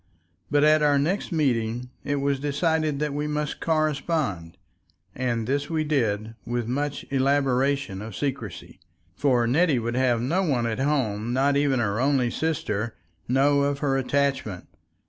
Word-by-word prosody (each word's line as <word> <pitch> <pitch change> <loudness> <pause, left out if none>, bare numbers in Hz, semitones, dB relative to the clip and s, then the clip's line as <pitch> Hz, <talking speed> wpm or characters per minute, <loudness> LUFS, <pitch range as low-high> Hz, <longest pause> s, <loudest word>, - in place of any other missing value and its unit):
But 145 +1 +3
at 155 0 +5
our 145 -1 +4
next 175 +10 -1
meeting 125 -5 0
it 145 - -1
was 140 -1 0
decided 155 +1 0
that 150 0 -2
we 150 +1 -2
must 150 0 -2
correspond, 150 - -1 0.6
and 120 -3 -1
this 140 +4 -1
we 160 -2 0
did 115 -7 0
with 120 -1 -2
much 145 +3 -2
elaboration 135 -4 +1
of 110 -2 -7
secrecy, 130 - -5 0.4
for 125 -3 +2
Nettie 150 +4 +3
would 120 0 -2
have 125 -2 +2
no 150 +11 +1
one 135 -10 +1
at 115 0 -2
home, 120 -6 0
not 140 +2 +2
even 140 -2 +2
her 105 -2 0
only 130 -3 +2
sister, 115 -9 -2 0.3
know 140 +3 +3
of 140 0 0
her 140 -2 0
attachment. 135 -7 -1
135 Hz, 150 wpm, -25 LUFS, 120-145 Hz, 0.6 s, at